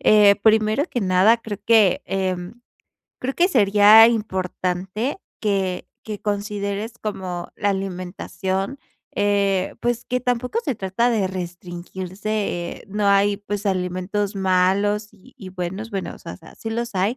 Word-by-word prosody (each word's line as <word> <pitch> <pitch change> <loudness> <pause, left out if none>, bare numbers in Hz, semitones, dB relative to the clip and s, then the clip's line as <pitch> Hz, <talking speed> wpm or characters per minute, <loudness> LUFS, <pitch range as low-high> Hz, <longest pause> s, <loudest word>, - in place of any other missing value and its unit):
Eh, 210 -1 +6
primero 220 +4 +3
que 245 - -1
nada, 190 +4 +4
creo 215 -3 -7
que, 220 -5 +4
em, 190 +3 -3 0.6
creo 265 +1 -3
que 355 +2 +3
sería 210 - +7
importante 190 - -2 0.2
que 195 -4 -1 0.2
que 210 -2 -6
consideres 205 +1 -3
como 185 -4 -4
la 205 - 0
alimentación, 190 +3 -3 0.4
eh, 200 -2 +1
pues, 240 0 -1
que 250 +1 -1
tampoco 250 - -1
se 275 -7 0
trata 200 +5 0
de 215 -5 +1
restringirse, 180 +2 -7
eh, 175 -5 -3
no 205 +1 -1
hay, 200 0 +4
pues, 205 0 -5
alimentos 190 +2 -1
malos 195 +3 +2
y 195 - -20
y 190 - -8
buenos, 185 +4 -5
bueno, 195 -3 -4
o - - -14
sea 170 - -9
sea, 165 - -16
sí 225 - -6
los 235 0 -3
hay, 195 +7 +1
200 Hz, 145 wpm, -22 LUFS, 185-220 Hz, 0.6 s, sería